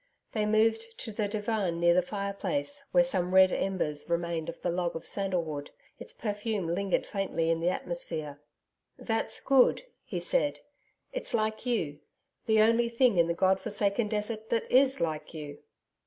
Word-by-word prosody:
They 215 Hz, -1 st, 0 dB
moved 225 Hz, +1 st, +1 dB
to 225 Hz, -, -3 dB
the 205 Hz, 0 st, -1 dB
divan 205 Hz, -4 st, -1 dB
near 170 Hz, 0 st, +5 dB
the 180 Hz, -, +4 dB
fireplace, 210 Hz, +10 st, -3 dB
where 265 Hz, -, +5 dB
some 185 Hz, -8 st, -1 dB
red 190 Hz, -1 st, +7 dB
embers 175 Hz, -6 st, -2 dB
remained 170 Hz, -1 st, -1 dB
of 170 Hz, -, -8 dB
the 175 Hz, -, +1 dB
log 175 Hz, 0 st, -1 dB
of 165 Hz, -, -6 dB
sandalwood. 170 Hz, -7 st, -2 dB, 0.3 s
Its -, -, -2 dB
perfume 210 Hz, -2 st, -3 dB
lingered 185 Hz, +3 st, 0 dB
faintly 185 Hz, -5 st, -1 dB
in 165 Hz, -, 0 dB
the 170 Hz, +2 st, +1 dB
atmosphere. 160 Hz, -5 st, -3 dB, 0.6 s
'That's 225 Hz, -1 st, 0 dB
good,' 270 Hz, -, +4 dB, 0.2 s
he -, -, -4 dB
said. -, -, 0 dB, 0.5 s
'It's -, -, 0 dB
like 220 Hz, +2 st, -1 dB
you; 160 Hz, -12 st, -1 dB, 0.5 s
the 220 Hz, -1 st, +5 dB
only 230 Hz, +2 st, +4 dB
thing 235 Hz, -3 st, +3 dB
in 170 Hz, -, +4 dB
the 170 Hz, -, -1 dB
god 190 Hz, +1 st, +3 dB
forsaken 205 Hz, +1 st, 0 dB
desert 215 Hz, +1 st, -2 dB
that 230 Hz, -, 0 dB
IS 270 Hz, +1 st, +5 dB
like 160 Hz, -1 st, -3 dB
you.' 145 Hz, -2 st, -7 dB
200 Hz, 165 wpm, -29 LUFS, 170-225 Hz, 0.6 s, red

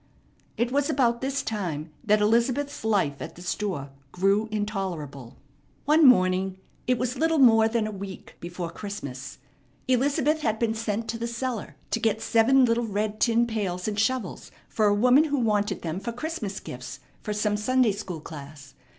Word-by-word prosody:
It 240 Hz, +1 st, 0 dB
was 285 Hz, +1 st, +1 dB
about 235 Hz, -3 st, +2 dB
this 275 Hz, +1 st, -1 dB
time 170 Hz, -8 st, -3 dB
that 210 Hz, 0 st, +3 dB
Elizabeth's 240 Hz, +7 st, +1 dB
life 195 Hz, -11 st, +1 dB
at -, -, -7 dB
the 175 Hz, -, -11 dB
store 175 Hz, -7 st, -3 dB, 0.2 s
grew 195 Hz, +4 st, +2 dB
intolerable. 185 Hz, -, -4 dB, 0.5 s
One 305 Hz, +1 st, +6 dB
morning 185 Hz, -4 st, +4 dB, 0.3 s
it 250 Hz, 0 st, +3 dB
was 250 Hz, +2 st, -2 dB
little 325 Hz, 0 st, +2 dB
more 225 Hz, -5 st, +6 dB
than 225 Hz, -1 st, 0 dB
a 215 Hz, -, -3 dB
week 195 Hz, -2 st, -8 dB
before 175 Hz, 0 st, -5 dB
Christmas 155 Hz, -12 st, -7 dB, 0.5 s
Elizabeth 280 Hz, +4 st, +2 dB
had 220 Hz, -6 st, 0 dB
been 225 Hz, -1 st, 0 dB
sent 225 Hz, 0 st, -2 dB
to 230 Hz, +1 st, -3 dB
the 235 Hz, -, -2 dB
cellar 235 Hz, -1 st, -4 dB, 0.2 s
to -, -, +1 dB
get 220 Hz, -1 st, +1 dB
seven 250 Hz, +4 st, +4 dB
little 230 Hz, 0 st, +1 dB
red 210 Hz, +1 st, -2 dB
tin 235 Hz, 0 st, +3 dB
pails 200 Hz, -6 st, -3 dB
and 210 Hz, -1 st, -2 dB
shovels 225 Hz, -3 st, -1 dB, 0.2 s
for 215 Hz, -2 st, +1 dB
a 205 Hz, -, +4 dB
woman 250 Hz, +8 st, +5 dB
who 290 Hz, -2 st, 0 dB
wanted 210 Hz, -4 st, 0 dB
them 165 Hz, +2 st, -3 dB
for 200 Hz, +4 st, -4 dB
Christmas 235 Hz, -, -4 dB
gifts 125 Hz, 0 st, -8 dB, 0.2 s
for 210 Hz, -, -4 dB
some 210 Hz, 0 st, 0 dB
Sunday 250 Hz, +2 st, +2 dB
school 190 Hz, -5 st, -6 dB
class. 145 Hz, -3 st, -10 dB
215 Hz, 170 wpm, -26 LUFS, 190-245 Hz, 0.5 s, One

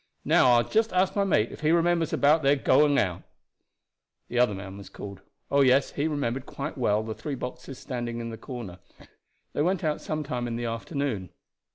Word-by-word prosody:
Now 125 Hz, -, +5 dB
I 120 Hz, -, +4 dB
will -, -, -13 dB
just 220 Hz, 0 st, +2 dB
ask 185 Hz, +1 st, +2 dB
my 200 Hz, -, +2 dB
mate 120 Hz, -, +2 dB
if -, -, -9 dB
he 155 Hz, -, +2 dB
remembers 170 Hz, -1 st, +2 dB
about 150 Hz, +3 st, +4 dB
their 140 Hz, 0 st, +4 dB
going 145 Hz, +1 st, +4 dB
out." 90 Hz, -3 st, 0 dB, 1.1 s
The 120 Hz, -, 0 dB
other 120 Hz, -5 st, +3 dB
man 95 Hz, 0 st, -8 dB
was 100 Hz, -, -11 dB
called. 100 Hz, -1 st, -9 dB, 0.3 s
Oh, 140 Hz, 0 st, +4 dB
yes, 135 Hz, +1 st, +4 dB
he 145 Hz, +2 st, -1 dB
remembered 135 Hz, -3 st, -2 dB
quite 140 Hz, +2 st, -5 dB
well 110 Hz, -4 st, +1 dB
the 110 Hz, 0 st, -4 dB
three 145 Hz, +4 st, -5 dB
boxes 125 Hz, +1 st, -7 dB
standing 120 Hz, -3 st, -4 dB
in 115 Hz, 0 st, -5 dB
the -, -, -6 dB
corner. 115 Hz, -6 st, -8 dB, 0.7 s
They -, -, 0 dB
went 180 Hz, +3 st, +1 dB
out 155 Hz, -1 st, -1 dB
some 155 Hz, 0 st, -3 dB
time 125 Hz, -4 st, -3 dB
in 115 Hz, -, -3 dB
the 120 Hz, 0 st, -3 dB
afternoon. 115 Hz, -, -3 dB
130 Hz, 205 wpm, -27 LUFS, 115-150 Hz, 1.1 s, Now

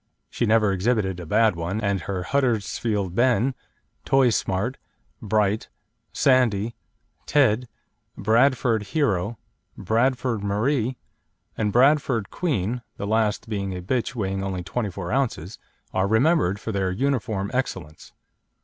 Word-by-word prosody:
She 120 Hz, -, -1 dB
never 110 Hz, -2 st, +4 dB
exhibited 95 Hz, -1 st, 0 dB
a 85 Hz, -, -8 dB
bad 110 Hz, +1 st, +3 dB
one, 85 Hz, +5 st, -3 dB
and 100 Hz, -3 st, 0 dB
her 95 Hz, +1 st, -3 dB
Huddersfield 110 Hz, -5 st, 0 dB
Ben, 125 Hz, +3 st, +2 dB, 0.5 s
Toy 135 Hz, -3 st, +4 dB
Smart, 105 Hz, +5 st, -1 dB, 0.4 s
Bright, 105 Hz, 0 st, 0 dB, 0.4 s
Sandy, 120 Hz, -4 st, +2 dB, 0.5 s
Ted, 125 Hz, -4 st, +3 dB, 0.5 s
Bradford 115 Hz, +1 st, +3 dB, 0.2 s
Hero, 105 Hz, -, +1 dB, 0.4 s
Bradford 115 Hz, +1 st, 0 dB
Marie, 120 Hz, +5 st, 0 dB, 0.6 s
and 105 Hz, -1 st, 0 dB
Bradford 130 Hz, -3 st, +3 dB
Queen 125 Hz, -, -1 dB, 0.2 s
the -, -, -4 dB
last 110 Hz, +2 st, 0 dB
being 100 Hz, -4 st, -3 dB
a -, -, -6 dB
bitch 120 Hz, +5 st, -1 dB
weighing 95 Hz, -3 st, -2 dB
only 95 Hz, -2 st, -3 dB
24 95 Hz, -4 st, -4 dB
oz. 115 Hz, -, -2 dB, 0.3 s
are 95 Hz, +1 st, +1 dB
remembered 110 Hz, -, +2 dB
for 110 Hz, -, -4 dB
their 95 Hz, -2 st, 0 dB
uniform 110 Hz, -3 st, -1 dB
excellence. 85 Hz, -, -4 dB
110 Hz, 120 wpm, -24 LUFS, 95-125 Hz, 0.6 s, never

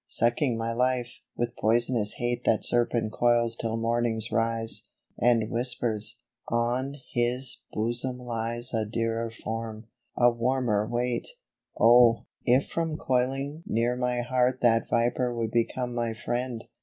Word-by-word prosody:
Sucking 120 Hz, +1 st, +1 dB
my 115 Hz, 0 st, -2 dB
life, 125 Hz, 0 st, -1 dB, 0.2 s
with 120 Hz, 0 st, -2 dB
poisonous 115 Hz, -1 st, +3 dB
hate 120 Hz, 0 st, -2 dB
That 110 Hz, -, +3 dB
serpent 120 Hz, -2 st, +1 dB
coils 120 Hz, 0 st, +2 dB
till 115 Hz, 0 st, -2 dB
morning's 115 Hz, -1 st, -1 dB
rise, 115 Hz, 0 st, 0 dB, 0.3 s
And 115 Hz, -3 st, +3 dB
whispers, 120 Hz, -2 st, -1 dB, 0.2 s
" 120 Hz, -, -47 dB
On 120 Hz, +4 st, 0 dB, 0.2 s
his 125 Hz, +1 st, -1 dB
bosom 120 Hz, +3 st, -2 dB
lies 120 Hz, 0 st, -4 dB
A 110 Hz, -1 st, +1 dB
dearer 115 Hz, +1 st, -2 dB
form 115 Hz, 0 st, -6 dB, 0.2 s
— -, -, -41 dB
a 120 Hz, 0 st, +5 dB
warmer 120 Hz, -3 st, 0 dB
weight." 120 Hz, 0 st, -1 dB, 0.5 s
Oh! 120 Hz, 0 st, +6 dB, 0.2 s
if 125 Hz, +2 st, +3 dB
from 165 Hz, -2 st, -2 dB
coiling 135 Hz, +3 st, -1 dB
near 120 Hz, +2 st, +1 dB
my 125 Hz, -1 st, 0 dB
heart 125 Hz, +1 st, +1 dB
That 115 Hz, -2 st, +3 dB
viper 120 Hz, +1 st, +1 dB
would 115 Hz, -1 st, -2 dB
become 120 Hz, +2 st, -1 dB
my 120 Hz, -1 st, -1 dB
friend 120 Hz, 0 st, -3 dB
120 Hz, 140 wpm, -27 LUFS, 115-125 Hz, 0.5 s, Oh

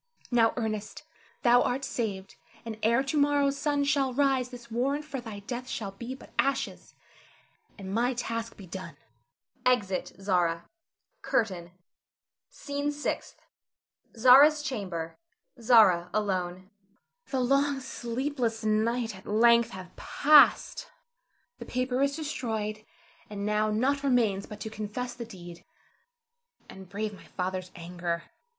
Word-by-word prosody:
Now, 230 Hz, -2 st, +4 dB
Ernest, 215 Hz, +2 st, -3 dB, 0.4 s
thou 245 Hz, 0 st, +6 dB
art 265 Hz, +2 st, -1 dB
saved, 195 Hz, -5 st, -4 dB, 0.3 s
and 225 Hz, -1 st, -5 dB
ere 235 Hz, +4 st, +3 dB
to 285 Hz, +2 st, 0 dB
morrow's 285 Hz, -1 st, +3 dB
sun 285 Hz, 0 st, 0 dB
shall 275 Hz, -3 st, +1 dB
rise 270 Hz, -3 st, +2 dB
this 245 Hz, -2 st, -12 dB
warrant 275 Hz, +6 st, 0 dB
for 275 Hz, -4 st, -5 dB
thy 215 Hz, -4 st, -8 dB
death 250 Hz, +4 st, -6 dB
shall 200 Hz, -3 st, -4 dB
be 235 Hz, +6 st, -7 dB
but -, -, -15 dB
ashes, 275 Hz, 0 st, -1 dB, 0.8 s
and 195 Hz, -1 st, -6 dB
my 245 Hz, +3 st, +1 dB
task 230 Hz, -1 st, -4 dB
be 195 Hz, -, -10 dB
done. 175 Hz, -4 st, -8 dB, 0.7 s
[Exit 210 Hz, -7 st, +1 dB
Zara. 175 Hz, -4 st, 0 dB, 0.5 s
CURTAIN. 180 Hz, -, -1 dB, 0.8 s
SCENE 285 Hz, 0 st, -3 dB
SIXTH. 295 Hz, 0 st, -4 dB, 0.8 s
[Zara's 280 Hz, +6 st, +7 dB
chamber. 185 Hz, -, -4 dB, 0.4 s
Zara 210 Hz, -7 st, +5 dB
alone]. 185 Hz, -2 st, -2 dB, 0.6 s
Zara. 260 Hz, -2 st, 0 dB
The -, -, 0 dB
long, 275 Hz, +1 st, +2 dB
sleepless 245 Hz, -2 st, -3 dB
night 220 Hz, +1 st, +1 dB
at 190 Hz, -, -14 dB
length 235 Hz, +2 st, +5 dB
hath 185 Hz, -3 st, -10 dB
passed. 300 Hz, -, +4 dB, 0.7 s
The -, -, -7 dB
paper 255 Hz, +1 st, -1 dB
is 280 Hz, 0 st, +2 dB
destroyed, 220 Hz, -9 st, -3 dB, 0.5 s
and 200 Hz, -1 st, -5 dB
now 210 Hz, 0 st, +1 dB
nought 260 Hz, +7 st, +1 dB
remains 230 Hz, -8 st, +1 dB
but 210 Hz, 0 st, -10 dB
to 220 Hz, -, -5 dB
confess 220 Hz, +4 st, -4 dB
the 235 Hz, -, -7 dB
deed, 175 Hz, -5 st, -11 dB, 1.0 s
and 190 Hz, -1 st, -12 dB
brave 210 Hz, +2 st, -3 dB
my 195 Hz, -, -14 dB
father's 185 Hz, 0 st, -4 dB
anger. 170 Hz, -1 st, -4 dB
230 Hz, 130 wpm, -28 LUFS, 195-265 Hz, 1.0 s, Zara's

